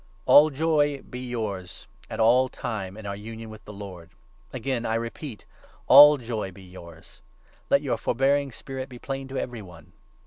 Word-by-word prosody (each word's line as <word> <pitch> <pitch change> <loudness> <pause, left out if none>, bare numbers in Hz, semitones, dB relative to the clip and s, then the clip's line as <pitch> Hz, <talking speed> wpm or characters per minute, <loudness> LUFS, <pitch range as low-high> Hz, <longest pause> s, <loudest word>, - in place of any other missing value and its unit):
All 150 +2 +7
joy 145 -1 +1
be 125 - -7
yours 110 -7 -5 0.2
at - - -6
all 125 +4 +4
times 100 -6 -5
in 110 - -10
your 100 - -3
union 110 +2 -8
with 110 0 -12
the - - -9
Lord. 95 -5 -10 0.4
4 - - -6
Again 125 0 -2
I 110 -1 -1
repeat 115 +1 -6 0.2
— - - -29
All 150 0 +9
joy 115 -6 -4
be 95 +1 -14
yours. 85 -3 -14 0.5
Let - - +3
your - - -1
forbearing 135 +3 +1
spirit 130 +3 -6
5 - - -24
be 125 - -10
plain 135 +2 -5
to 135 0 -6
every 120 -4 -4
one. 85 -5 -15
115 Hz, 185 wpm, -25 LUFS, 100-135 Hz, 0.5 s, All